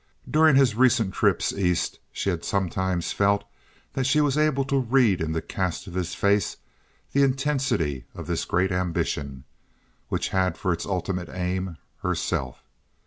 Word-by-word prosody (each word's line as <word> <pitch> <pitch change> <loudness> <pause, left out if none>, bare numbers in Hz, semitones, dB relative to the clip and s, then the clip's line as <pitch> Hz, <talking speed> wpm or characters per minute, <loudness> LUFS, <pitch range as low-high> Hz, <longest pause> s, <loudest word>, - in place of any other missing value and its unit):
During 155 +2 +5
his 135 -4 +5
recent 120 -4 +3
trips - - +2
East 90 -3 0
she 100 - -1
had 85 -2 -4
sometimes 95 -2 -1
felt 100 0 +2 0.5
that 130 -1 0
she 135 +3 +3
was 145 -2 +2
able 150 -3 +2
to 135 0 +1
read 120 -7 +3
in 80 -1 -1
the 80 - -2
cast 90 -3 -3
of 90 - -9
his 90 -1 -2
face 100 -2 +1 0.5
the 140 - +3
intensity 135 - 0
of - - -7
this - - -1
great 90 +2 +1
ambition, 70 -7 -2 0.7
which - - -1
had 95 -3 +1
for 90 - 0
its 85 - -5
ultimate 90 -2 -2
aim—herself. 90 -1 -3
95 Hz, 150 wpm, -25 LUFS, 90-130 Hz, 0.7 s, During